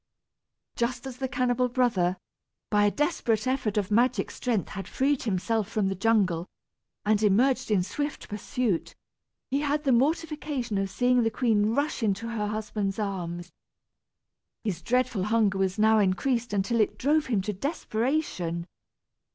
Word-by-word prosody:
Just 245 +2 -2
as 260 -2 -7
the 265 0 -2
cannibal 250 -1 +1
brother, 215 -8 +1 0.5
by 205 -1 +4
a - - +5
desperate 235 -6 0
effort 255 -5 0
of 205 -1 0
magic 235 -1 +2
strength 230 -6 -1
had 195 -1 -6
freed 275 +1 +1
himself 220 0 -1
from 205 -3 0
the - - -1
jungle, 195 -4 +1 0.6
and 210 0 +3
emerged 230 +7 +3
in 200 -4 +3
swift 290 +10 -4
pursuit, 210 -2 -2 0.6
he 275 - +2
had 295 0 0
the 275 - +2
mortification 290 - 0
of 195 0 -1
seeing 250 +4 +2
the 225 - +2
queen 220 -2 +1
rush 285 -1 0
into 215 +1 0
her 215 -3 -2
husband's 210 -2 -2
arms. 175 -4 -4 1.1
His 190 -6 -2
dreadful 245 -1 0
hunger 210 -3 +2
was 190 0 0
now 220 +1 +5
increased 230 +5 +1
until 205 +4 0
it 210 - 0
drove 300 +3 +2
him 220 -6 +1
to 210 - -2
desperation. 220 - -2
225 Hz, 150 wpm, -27 LUFS, 200-255 Hz, 1.1 s, a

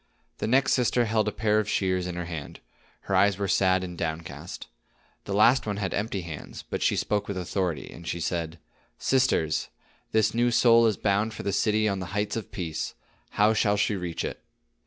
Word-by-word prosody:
The - - -1
next 135 +4 +3
sister 125 -1 +2
held 110 -1 +1
a - - +1
pair 110 -1 +1
of 105 -1 -2
shears 95 -2 0
in 90 - -4
her 90 -1 -3
hand; 80 -4 -7 0.4
her - - -2
eyes 100 -2 +4
were 100 -1 -1
sad 95 0 +3
and 90 -1 -6
downcast. 80 -1 -5 0.6
The 100 - -4
last 115 +4 +5
one 105 -1 -2
had 100 -2 -2
empty 105 -2 -2
hands, 80 -4 -8
but - - -4
she - - +2
spoke 105 -1 -1
with 100 - -4
authority, 90 -4 -2
and 85 0 -11
she 85 - -2
said: 85 0 -2 0.4
"Sisters, 125 -12 +1 0.4
this 110 -1 +2
new 120 +1 +2
soul 115 -1 +5
is 110 - 0
bound 105 +2 0
for - - -6
the 100 - -1
city 110 0 +2
on 100 -2 -1
the 90 - -5
heights 105 0 -1
of 115 - -5
Peace. 85 -5 -4 0.4
How 105 +2 +5
shall 105 -1 +2
she 105 +1 +1
reach 90 -3 -3
it?" - - -5
100 Hz, 200 wpm, -27 LUFS, 90-110 Hz, 0.6 s, last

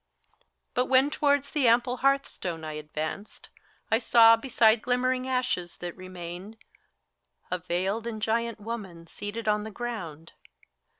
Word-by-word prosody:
But 250 +1 +1
when 265 +2 +4
towards 285 -2 +1
the 285 -5 +2
ample 240 +2 +3
hearth 275 +2 +3
stone 165 -3 -6
I 155 -1 -5
advanced, 155 +6 -6 0.4
I 225 - +4
saw, 230 -1 +7
beside 225 -2 +3
the - - -20
glimmering 255 +1 +1
ashes 250 -9 -1
that 175 -1 -6
remained, 185 +3 -8 0.9
A 180 - -1
veiled 190 +6 -2
and 220 -2 -4
giant 230 +1 -1
woman 205 -6 -7
seated 205 +6 -6
on 210 0 +2
the 220 - -6
ground. 190 -9 -6
220 Hz, 140 wpm, -27 LUFS, 180-245 Hz, 0.9 s, saw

